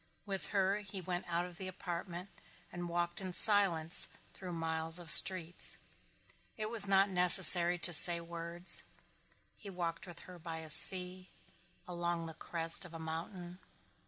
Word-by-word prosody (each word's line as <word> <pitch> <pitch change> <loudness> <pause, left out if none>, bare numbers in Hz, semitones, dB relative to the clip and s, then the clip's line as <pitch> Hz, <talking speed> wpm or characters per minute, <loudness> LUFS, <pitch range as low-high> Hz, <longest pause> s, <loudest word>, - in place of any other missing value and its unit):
With 195 -2 -6
her 195 0 -2
he 205 -2 -10
went 180 0 -8
out 175 0 -4
of 180 +1 -15
the 190 - -8
apartment 180 0 -9 0.4
and 175 0 -9
walked 175 +1 -4
in 185 -1 -8
silence 175 -6 +3 0.3
through 180 -2 -11
miles 165 0 -3
of 170 -3 -1
streets. 180 -2 +1 0.8
It 215 0 -7
was 215 -4 +4
not 195 0 +1
necessary 180 -1 +7
to 175 0 0
say 170 +1 +4
words. 170 +1 -4 0.8
He 205 - -12
walked 170 -2 -8
with 175 -2 -12
her 180 -1 -15
by 165 0 -10
a 160 -1 -5
sea, 185 +2 +1 0.6
along 175 -1 -6
the 165 - -10
crest 165 +1 -1
of 170 -2 -13
a - - -8
mountain. 175 +3 -10
175 Hz, 155 wpm, -31 LUFS, 170-185 Hz, 0.8 s, necessary